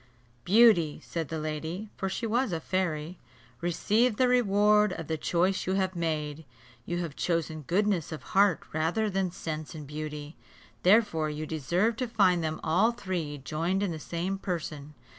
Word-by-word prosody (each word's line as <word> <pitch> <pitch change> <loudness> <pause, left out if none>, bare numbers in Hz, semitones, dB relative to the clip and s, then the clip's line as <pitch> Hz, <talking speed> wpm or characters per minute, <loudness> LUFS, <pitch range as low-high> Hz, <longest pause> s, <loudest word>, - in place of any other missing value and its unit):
"Beauty," 200 -7 +5
said 165 -3 -4
the 160 - -4
lady 160 +6 -4
(for 195 - -2
she 230 - -3
was 235 +1 +1
a 165 - -1
fairy), 170 -1 -2 0.4
"receive 210 +7 +1
the 255 - +4
reward 210 -3 +4
of 165 - -6
the 160 - -2
choice 180 +5 0
you 190 - +1
have 190 -1 0
made. 155 -2 -2 0.4
You 175 - -1
have 170 -5 -4
chosen 165 -2 -1
goodness 180 +3 0
of 155 - -6
heart 195 -3 +4
rather 175 +8 0
than 190 -1 0
sense 155 -2 -6
and 150 -2 -7
beauty; 150 +1 -6 0.5
therefore 185 -6 +4
you 150 +1 -4
deserve 175 - 0
to 255 - -1
find 190 -7 +3
them 155 0 -2
all 190 +9 +3
three 175 -9 -4
joined 165 +8 -1
in 195 - 0
the 160 - -5
same 175 +5 -3
person. 155 -6 -5
175 Hz, 165 wpm, -28 LUFS, 155-200 Hz, 0.5 s, Beauty